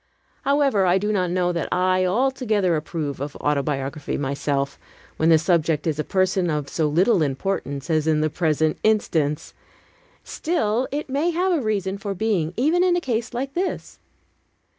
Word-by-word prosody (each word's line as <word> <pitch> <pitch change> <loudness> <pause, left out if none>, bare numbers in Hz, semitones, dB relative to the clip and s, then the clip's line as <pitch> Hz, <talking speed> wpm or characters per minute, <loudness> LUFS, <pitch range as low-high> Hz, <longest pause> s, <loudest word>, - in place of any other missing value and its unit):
However, 275 -9 +2
I 180 +1 +4
do 210 +2 -1
not 185 -4 0
know 180 0 +1
that 170 -1 -3
I 185 0 +2
altogether 215 -4 +1
approve 150 -3 -4
of 145 0 -5
autobiography 140 0 -2
myself, 140 0 -2 0.4
when 160 - +2
the 160 - +7
subject 160 -2 +1
is 155 -2 -1
a - - +1
person 185 -1 +1
of 150 -3 -2
so 155 +2 0
little 175 +5 +3
importance 140 -1 -2
as 155 -2 +1
in 155 -1 +2
the 155 - +1
present 155 -2 0
instance. 160 -9 0 0.7
Still, 255 -7 -1
it 295 +2 -3
may 285 +5 0
have 360 +3 +1
a 335 -5 +1
reason 200 -3 -1
for 200 0 -4
being, 185 -6 0
even 315 +8 +3
in 360 -1 +3
a - - +2
case 240 -6 -2
like 265 +3 -4
this. 365 +2 -3
180 Hz, 165 wpm, -23 LUFS, 155-225 Hz, 0.7 s, the